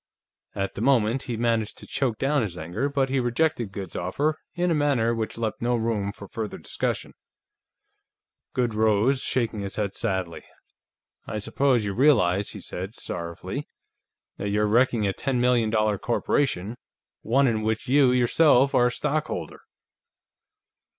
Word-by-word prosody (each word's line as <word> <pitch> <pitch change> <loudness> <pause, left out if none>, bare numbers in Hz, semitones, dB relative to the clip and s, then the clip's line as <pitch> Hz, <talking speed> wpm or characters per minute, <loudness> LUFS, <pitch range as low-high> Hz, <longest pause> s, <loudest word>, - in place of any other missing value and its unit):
At 100 -1 -2
the - - -6
moment, 120 -1 +3
he 120 -4 -4
managed 115 -2 0
to - - -9
choke 125 -5 -1
down 140 +3 +1
his 95 -6 -3
anger, 90 - -2
but 135 -2 0
he 135 0 +1
rejected 120 -2 0
Goode's 95 -1 -7
offer 145 - -1 0.2
in 175 0 +1
a - - +4
manner 140 -7 +2
which 115 -1 -3
left 110 -2 -3
no 120 +1 +1
room 110 -3 -1
for 100 0 -11
further 110 +2 -5
discussion. - - -3 1.4
Goode 120 -3 +1
rose, 110 +5 +3
shaking 115 -4 0
his 100 -1 -5
head 100 -2 -2
sadly. 95 -4 -2 0.8
"I 110 - -3
suppose 125 +2 +1
you 100 - -2
realize," 105 -7 +3
he - - -8
said, 95 +5 -6
sorrowfully, 85 -6 -5 0.7
"that 100 - -3
you're 105 +1 +1
wrecking 115 0 +3
a 100 - 0
ten 135 +1 -1
million 120 -2 +3
dollar 110 -2 +1
corporation. 120 -3 0 0.4
One 135 +5 +3
in 110 -4 +1
which 110 +4 -2
you, 135 0 +5
yourself, 130 +2 +4
are 125 - +5
a - - -1
stockholder." 150 +3 -3
115 Hz, 155 wpm, -25 LUFS, 105-135 Hz, 1.4 s, you